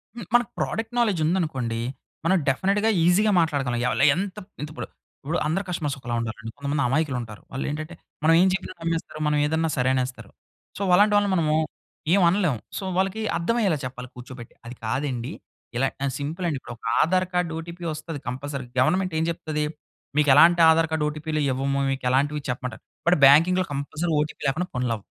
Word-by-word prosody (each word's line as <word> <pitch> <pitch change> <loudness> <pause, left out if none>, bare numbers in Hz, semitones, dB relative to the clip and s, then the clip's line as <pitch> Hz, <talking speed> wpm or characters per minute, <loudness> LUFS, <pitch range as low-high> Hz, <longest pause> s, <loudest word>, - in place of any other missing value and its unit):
హ్మ్, 235 -4 -7
మనకు 240 -3 +4
product 225 +1 -2
knowledge 210 -8 +2
ఉందనుకోండి. 145 -10 -1 0.5
మనం 190 +3 +4
డెఫినిట్‌గా 200 +10 +1 0.2
ఈజీగా 205 +5 +4
మాట్లాడగలం 140 -7 0
ఎవలు, - - +1
ఎంతప్ 195 +2 -5
ఇంతిప్పుడు. 150 +1 -6 0.4
ఇప్పుడు 160 +5 -1
అందరూ 170 +6 0
కస్టమర్స్ 155 -5 -2
ఒకలా 120 -1 -3
ఉండరండి. 115 -1 -5
కొంతమంది 140 0 -1
అమాయకులుంటారు. 125 -6 -2
వాళ్ళేంటంటే, 155 +5 -4 0.3
మనం 160 - +5
ఏం 190 - +5
చెప్పినా 190 -1 -3
నమ్మేస్తారు, 165 -2 -3
మనం 150 0 +2
ఏదన్నా 160 +2 0
సరే 125 0 +2
అనేస్తారు. 125 -5 -3 0.5
సో, - - -6
అలాంటి 205 +3 +5
వాళ్ళని 205 -1 +2
మనము 155 -3 +2 0.6
ఏవనలేము. 175 - +3 0.2
సో, - - -4
వాళ్ళకి 190 +3 0 0.2
అర్థవయ్యేలా 195 -1 +1
చెప్పాలి, 125 -1 -7
కూర్చోబెట్టి. 125 -1 -10
అది 120 +2 -8
కాదండి, 130 +1 -2 0.5
ఇలా 135 +2 +2 0.2
ఎ - - +1
సింపులండి, 160 +2 -2
ఇప్పుడొక 120 -2 -11 0.2
ఆధారు 185 +2 +2
కార్డు 180 -2 0
ఓటీపీ 170 +1 -9
వస్తది 155 0 -6
కంపల్సరీ. 135 +1 -4
గవర్నమెంట్ 185 +7 +2
ఏం 160 - +1
చెప్తది, 155 -2 -2 0.5
మీకెలాంటి 150 +4 +6
ఆధారు 165 0 +4
కార్డు 160 -1 0
ఓటీపీలు 155 0 -3
ఇవ్వము, 135 +1 0
మీకెలాంటివి 135 +3 0
చెప్పమంటారు. 125 -2 -4 0.2
బట్, 175 - +5
బ్యాంకింగ్‌లో 170 +7 +6
కంపల్సరీ 155 +4 -3
ఓటీపీ 150 - -5
లేకుండా 160 +7 0
పనులవ్వవు. 120 -4 -1
155 Hz, 155 wpm, -24 LUFS, 130-180 Hz, 0.6 s, మీకెలాంటి